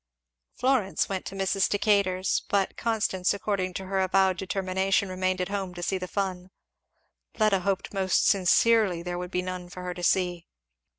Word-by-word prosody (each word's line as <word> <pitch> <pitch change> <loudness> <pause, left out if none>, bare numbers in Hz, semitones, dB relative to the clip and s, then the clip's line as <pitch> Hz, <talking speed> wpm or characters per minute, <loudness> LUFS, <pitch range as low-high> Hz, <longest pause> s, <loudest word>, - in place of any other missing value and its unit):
Florence 240 -10 +1
went 190 -2 -3
to 195 - -7
Mrs. 195 0 +1
Decatur's; 200 -2 +1
but 200 -1 +1
Constance 210 -5 0
according 195 -3 -2
to 190 - -4
her 190 0 -1
avowed 190 0 +3
determination 190 0 0
remained 185 0 -1
at 180 0 -2
home 195 -3 -4
to 175 - -6
see 190 +2 -1
the 185 - -5
fun. 185 -2 -3 0.9
Fleda 215 -3 +3
hoped 195 +2 -2
most 190 -1 +2
sincerely 195 -1 +3
there 175 0 -4
would 180 0 -5
be 180 0 -2
none 180 -1 -6
for 180 0 -9
her 180 0 -4
to 175 - -8
see. 175 -1 0
190 Hz, 170 wpm, -27 LUFS, 180-195 Hz, 0.9 s, avowed